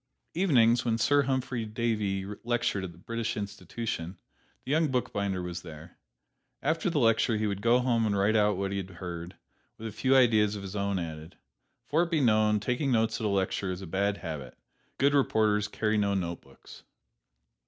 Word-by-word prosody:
Evenings, 125 -10 +4
when 115 -2 +1
Sir 145 +5 +3
Humphry 130 -3 -1
Davy 105 -3 -1 0.2
lectured 120 -4 0
at 95 - -5
the 85 - -17
British 115 +5 -3
Institution, 100 -3 -5 0.5
the 130 - -4
young 160 +1 +3
bookbinder 100 -8 -1
was 85 -1 -5
there. 80 0 -11 0.7
After 160 +4 +1
the 165 - -1
lecture 115 -2 +3
he 110 - -1
would 100 -1 -2
go 115 +2 +4
home 120 -3 +1
and 100 -1 0
write 100 +3 +2
out 105 -2 +3
what 100 0 -2
he 100 - -2
had 95 -1 -4
heard, 85 -1 -7 0.4
with 110 - -9
a - - -5
few 130 +6 +2
ideas 110 -5 +4
of 100 - -6
his 95 +1 -7
own 100 -1 0
added. 80 -2 -6 0.5
For 165 +4 +1
be 165 -1 0
it - - +2
known, 110 -3 +3
taking 125 +6 -1
notes 115 -1 +1
at - - -1
a - - 0
lecture 95 0 0
is 90 +1 -5
a - - -5
bad 100 +3 0
habit 75 -8 -7 0.4
good 140 +1 +3
reporters 110 -6 +2
carry 110 0 0
no 100 -1 +1
notebooks. 85 -7 -6
105 Hz, 185 wpm, -29 LUFS, 95-120 Hz, 0.7 s, Evenings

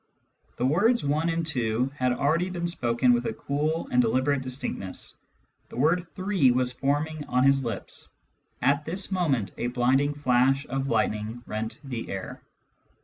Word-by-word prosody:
The 125 - -1
words 205 - +3
one 150 +4 +1
and 165 0 -1
two 125 -3 0
had 125 -3 +1
already 160 +8 +1
been 175 -1 -3
spoken 125 -6 +2
with 120 0 0
a - - -2
cool 150 +6 -2
and 125 - +5
deliberate 130 +4 +1
distinctness. 130 -7 -3 0.6
The - - -10
word 165 +6 +2
three 185 -8 +2
was 125 0 +2
forming 145 +4 -1
on 125 +1 +1
his 135 0 +4
lips. 115 -6 -4 0.5
At 140 +3 +3
this 185 +6 -1
moment 140 - 0
a 120 - 0
blinding 130 +4 +2
flash 135 0 +2
of 135 +1 -2
lightning 110 0 -1
rent 110 +1 -4
the 125 -5 -5
air." 95 -1 -6
135 Hz, 155 wpm, -26 LUFS, 120-155 Hz, 0.6 s, and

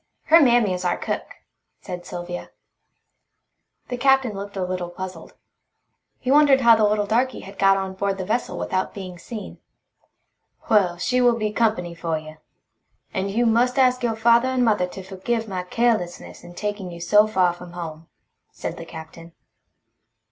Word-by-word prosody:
Her 330 +1 +6
mammy 240 -7 +4
is 180 0 -4
our 175 -1 0
cook," - - -3 0.5
said 180 -1 -8
Sylvia. 175 0 -6 1.4
The 245 - -3
Captain 265 -2 +3
looked 200 0 -7
a 185 - -1
little 180 -1 -3
puzzled. 180 -1 -8 0.8
He 255 - -2
wondered 285 -2 +6
how 235 -2 +7
the 220 -1 +3
little 210 0 +1
darky 240 +4 0
had 195 +1 -12
got 195 0 +5
on 190 -1 -3
board 195 0 -2
the 190 - -4
vessel 235 +5 -2
without 185 0 -2
being 185 -3 -8
seen. 220 +3 -8 1.1
"Well, 185 -5 +3
she 250 +7 +1
will 240 -1 +4
be 215 -2 -1
company 215 -6 0
for 165 -1 -2
you. 155 0 -10 0.8
And 195 0 -1
you 230 +5 +1
must 240 +3 +2
ask 255 -1 +3
your 235 -2 0
father 235 +2 +4
and 260 -1 +1
mother 210 -5 +2
to 190 +1 -9
forgive 220 +5 -3
my 185 -3 -3
carelessness 210 -2 -1
in 175 0 -12
taking 205 -2 -4
you 170 -1 -9
so 210 +5 +4
far 185 -5 +2
from 175 0 -12
home," 165 -2 -7 0.4
said - - -6
the - - -8
Captain. 165 +1 -11
200 Hz, 170 wpm, -23 LUFS, 180-235 Hz, 1.4 s, how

